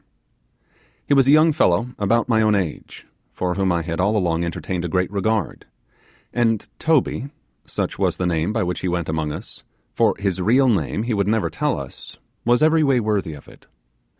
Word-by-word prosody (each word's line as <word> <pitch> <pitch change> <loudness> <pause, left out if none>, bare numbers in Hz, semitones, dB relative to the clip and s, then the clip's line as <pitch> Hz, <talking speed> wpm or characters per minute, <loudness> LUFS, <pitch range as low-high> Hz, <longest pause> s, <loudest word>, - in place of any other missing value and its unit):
He - - +1
was 135 -2 +4
a - - +6
young 155 +2 +6
fellow 110 +1 +2
about 115 +4 +1
my 110 -2 +3
own 105 -1 +3
age, 90 -6 -4 0.3
for 90 -1 -2
whom 95 0 0
I 85 -1 0
had 85 +1 -4
all 100 +4 +2
along 85 -3 0
entertained 85 +1 -3
a - - -2
great 90 +2 -1
regard; 105 0 -2 0.7
and 115 -3 +1
Toby, 145 -3 +1 0.4
such - - -4
was - - +1
the 90 - -1
name 85 +1 0
by 110 0 0
which 90 0 -2
he - - -3
went 85 -2 -2
among 80 -1 -2
us, - - -8 0.3
for - - +2
his 95 -2 -2
real 125 +7 +4
name 105 -1 0
he 120 0 -2
would 100 -2 0
never 110 0 0
tell - - -1
us, - - -10 0.3
was 120 +4 +3
every 160 +1 +4
way 135 -3 +3
worthy 105 -7 -1
of 70 - -15
it. - - -18
100 Hz, 195 wpm, -21 LUFS, 90-120 Hz, 0.7 s, a